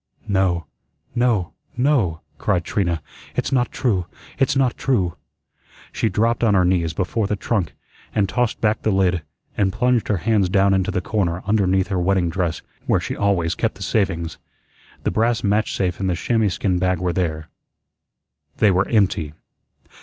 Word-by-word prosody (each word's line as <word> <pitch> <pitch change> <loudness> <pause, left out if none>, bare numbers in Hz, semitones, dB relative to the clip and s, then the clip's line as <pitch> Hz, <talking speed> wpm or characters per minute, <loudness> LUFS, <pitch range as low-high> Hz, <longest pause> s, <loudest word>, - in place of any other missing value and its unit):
"No, 95 -4 +1 0.5
no, 110 -10 +1 0.2
no," 120 - +2 0.2
cried 95 -5 +1
Trina, 85 -4 -1 0.3
"it's - - -1
not 125 -2 +1
true; 95 -9 0 0.3
it's 135 0 +2
not 130 -3 +2
true." 95 -11 0 0.8
She 110 - 0
dropped 115 +2 +1
on 105 -3 +4
her 90 -1 +4
knees 90 -3 +1
before 100 +5 -1
the 105 - 0
trunk, 95 - -2 0.4
and 100 -2 +2
tossed 120 +3 0
back 105 -1 +1
the - - 0
lid, 95 -3 +2 0.3
and 95 -2 +2
plunged 125 +3 +1
her 105 - +1
hands 105 -1 +1
down 100 +1 +3
into 95 -1 +1
the 90 - -1
corner 90 -4 -1
underneath 95 -2 +2
her 95 -3 0
wedding 90 -2 +1
dress, 85 -2 -2 0.2
where - - +3
she - - -4
always 95 -5 +1
kept - - -1
the - - -7
savings. 95 -6 -1 0.6
The - - 0
brass 115 +1 +1
match 105 +2 +1
safe 90 -2 -1
and 95 -1 0
the 90 - +1
chamois 110 +4 +1
skin 90 0 0
bag 90 0 +1
were 90 0 -1
there. 80 -4 -2 1.1
They 105 - +4
were 95 +1 +2
empty. 95 -8 +1
95 Hz, 170 wpm, -21 LUFS, 90-110 Hz, 1.1 s, on